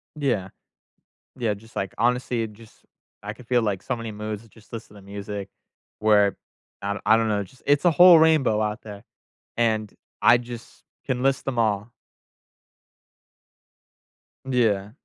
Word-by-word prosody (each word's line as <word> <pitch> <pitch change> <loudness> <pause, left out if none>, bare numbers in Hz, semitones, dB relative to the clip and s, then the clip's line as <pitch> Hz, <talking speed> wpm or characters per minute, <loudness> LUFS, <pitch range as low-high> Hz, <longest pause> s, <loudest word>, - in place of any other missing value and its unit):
Yeah. 120 -11 -1 0.9
Yeah, 115 -4 0
just, 110 +3 -17
like 95 - -3
honestly, 120 0 +1
it 110 - -5
just 110 +1 -18 0.4
I 105 +1 -5
could 125 0 -15
feel, 120 -2 +2
like, 100 -3 -1
so 125 - -2
many 115 -1 -6
moods 105 +1 -6
just 110 +1 -21
listening 105 -3 -9
to 95 - -18
music 100 0 -6 0.5
where 105 -2 +4 0.5
I 100 0 -1
do 100 - -7
I 110 +1 +6
don't 115 -1 +1
know. 105 -1 +1
It's 100 - -7
just 130 - -22
it's 145 +3 +3
a 175 - +6
whole 175 +1 +8
rainbow 155 -9 +4
out 105 +1 -2
there, 100 -2 -10 0.5
and 110 -3 0 0.3
I 120 - +7
just 120 -1 -10 0.2
can 125 0 -2
list 135 -1 +1
them 130 -3 -3
all. 105 +1 0 2.6
Yeah. 105 -6 +1
110 Hz, 160 wpm, -24 LUFS, 105-125 Hz, 2.6 s, whole